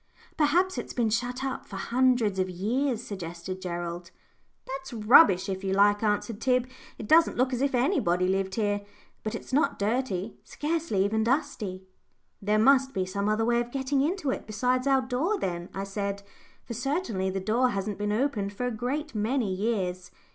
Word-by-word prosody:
"Perhaps 350 +5 +2
it's - - -6
been 230 -3 +1
shut 245 +3 -1
up 270 -1 -4
for 195 - -9
hundreds 235 -2 +2
of 185 0 0
years," 230 +7 -1
suggested 185 -1 -6
Gerald. 175 -1 -5 0.6
"That's 270 0 -6
rubbish, 220 - +6
if 190 0 -4
you 190 0 0
like," 205 +1 +4
answered 215 +1 -1
Tib. 255 -1 +2 0.3
"It 215 - -7
doesn't 325 +5 +5
look 255 +1 +2
as 250 - -1
if 275 -1 +1
anybody 185 - +2
lived 190 0 0
here, 205 -2 0 0.4
but 215 - -3
it's - - -8
not 300 +5 +2
dirty 210 -2 -1
scarcely 300 -10 -1
even 220 +2 +1
dusty." 220 -7 -1 0.6
"There 210 +1 +1
must 265 +4 +4
be 185 - 0
some 200 +2 -2
other 215 +1 +1
way 240 0 +2
of 240 - -5
getting 270 +1 0
into 310 -1 0
it - - -5
besides 250 +5 0
our 270 -1 +4
door, 275 +12 0
then," 175 - -3
I 195 - -4
said, 200 0 -4 0.4
"for 235 - -7
certainly 240 - -1
the 190 +1 -2
door 230 +6 +2
hasn't 200 -1 -3
been 210 0 -1
opened 215 -4 -1
for 245 +5 -3
a 245 - -1
great 265 +7 -3
many 220 -1 0
years. 185 -3 -2
220 Hz, 180 wpm, -27 LUFS, 195-260 Hz, 0.6 s, rubbish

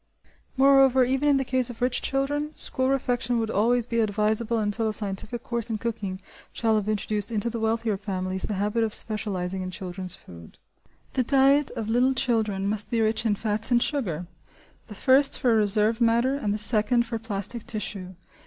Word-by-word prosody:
Moreover, 270 -1 +5
even 265 +3 0
in 280 - +4
the 270 - -1
case 255 -1 0
of 240 - -9
rich 250 0 0
children, 290 +3 -2
school 260 0 -1
refection 245 -3 0
would 225 -1 -1
always 235 +3 +2
be 230 -1 -2
advisable 215 +2 0
until 220 +1 -1
a 215 - -1
scientific 210 +3 0
course 235 -1 -3
in 220 - -2
cooking 210 -4 -4 0.3
shall 225 -2 0
have 210 -1 -1
introduced 210 +1 -1
into 225 +1 -1
the 230 - -4
wealthier 225 -1 -1
families 190 -1 -4
the 210 - -3
habit 210 +4 0
of 220 -1 +1
specialising 190 -4 -3
in 185 - -4
children's 185 -1 -5
food. 85 -2 -14 0.6
The 260 - +1
diet 275 +3 +3
of 220 - -4
little 250 +4 +2
children 220 -7 0
must 210 +1 -1
be 235 - 0
rich 220 +1 +1
in 210 - +1
fats 215 +2 +1
and 240 -1 +4
sugar: 180 - -2 0.6
the 210 - -10
first 270 +5 +4
for 245 -4 +2
reserve 215 +2 +2
matter 235 +3 +3
and 275 -7 -2
the 210 - -1
second 220 +2 +3
for 230 -1 -4
plastic 220 +1 -2
tissue. 195 -4 -5
225 Hz, 185 wpm, -25 LUFS, 205-245 Hz, 0.6 s, Moreover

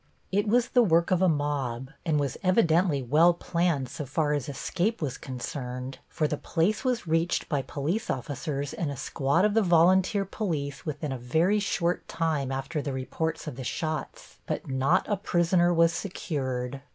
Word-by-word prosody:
It 205 +2 +1
was 240 +3 +3
the 250 - +4
work 170 -5 +3
of 185 -1 +3
a 185 - +5
mob, 140 -4 -2 0.2
and 155 -2 +2
was 140 -2 -1
evidently 175 - +3
well 160 +7 +5
planned 170 -6 0
so 150 +4 -6
far 150 +2 0
as 145 -2 -2
escape 180 - -1
was 145 -6 -2
concerned, 125 0 -6
for 155 -3 0
the 150 - -2
place 190 +8 0
was 250 -6 0
reached 165 +1 0
by 145 -4 0
police 150 - -3
officers, 140 +2 -3
and 165 - -2
a 140 - -5
squad 140 +7 +1
of 210 - +2
the 225 - +4
volunteer 185 +2 +4
police 160 -8 -3
within 150 -1 -3
a 130 - -4
very 160 - +2
short 175 -3 -1
time 155 -5 -1
after 135 +4 -3
the 140 -1 -3
reports 145 +5 -3
of 150 -6 -6
the 130 - -5
shots, 155 +5 -4
but - - -3
not 130 0 +2
a 205 - +1
prisoner 175 -2 +2
was 170 -1 +4
secured. 135 -9 -3
160 Hz, 175 wpm, -27 LUFS, 135-175 Hz, 0.2 s, a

